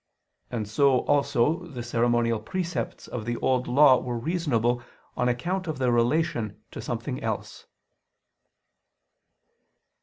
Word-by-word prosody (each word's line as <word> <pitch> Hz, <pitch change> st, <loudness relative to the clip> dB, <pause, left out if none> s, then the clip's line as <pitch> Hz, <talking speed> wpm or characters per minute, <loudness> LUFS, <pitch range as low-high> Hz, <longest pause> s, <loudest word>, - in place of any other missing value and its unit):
And 110 Hz, -4 st, -3 dB
so 130 Hz, +4 st, +3 dB
also 145 Hz, +4 st, +1 dB
the 125 Hz, -7 st, -6 dB
ceremonial 120 Hz, -1 st, +1 dB
precepts 175 Hz, -, -4 dB
of 120 Hz, -, -5 dB
the 120 Hz, +2 st, -2 dB
Old 130 Hz, -1 st, +1 dB
Law 130 Hz, 0 st, +6 dB
were 120 Hz, -1 st, -3 dB
reasonable 120 Hz, -5 st, 0 dB, 0.3 s
on 125 Hz, -, +1 dB
account 175 Hz, +10 st, -2 dB
of 155 Hz, -, -3 dB
their 130 Hz, -2 st, +1 dB
relation 120 Hz, -3 st, +1 dB
to -, -, -7 dB
something -, -, -4 dB
else. -, -, -4 dB
125 Hz, 120 wpm, -26 LUFS, 120-150 Hz, 0.3 s, Law